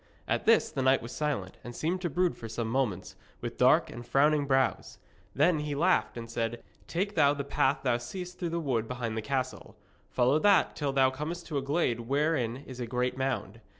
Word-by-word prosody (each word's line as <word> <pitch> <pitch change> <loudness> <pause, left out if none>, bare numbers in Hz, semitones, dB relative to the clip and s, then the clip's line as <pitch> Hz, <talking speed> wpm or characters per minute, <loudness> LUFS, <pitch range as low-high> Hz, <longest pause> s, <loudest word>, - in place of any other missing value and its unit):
At - - -1
this 230 0 +4
the 140 -4 -2
knight 130 -1 +3
was 115 - -7
silent, 140 -12 -3
and 120 -1 -8
seemed 180 +4 -1
to 175 - -1
brood 175 +3 +1
for 115 - -8
some 115 0 -3
moments, 110 -7 -1 0.2
with - - -6
dark - - +4
and 120 - -8
frowning 145 +3 +2
brows. 135 -1 +1 0.4
Then 155 +3 +3
he 150 -1 -3
laughed 175 -3 +2
and 115 -1 -6
said: 115 0 -3 0.2
'Take 195 +4 -2
thou 145 -5 +4
the 140 - -3
path 135 0 +1
thou 125 -3 +2
seest 180 +9 -7
through 175 - -2
the 170 +1 -2
wood 125 -8 -1
behind 120 -3 -3
the 110 - -2
castle. 130 +2 -3 0.3
Follow 130 +4 +3
that 200 +2 +4
till 145 -2 -1
thou 135 -1 +3
comest 160 +6 -5
to 150 - -2
a - - -4
glade 135 -4 0
wherein 135 0 0
is 130 -1 -9
a 120 - -3
great 125 +1 -1
mound. 130 -5 -3
135 Hz, 210 wpm, -29 LUFS, 120-155 Hz, 0.4 s, this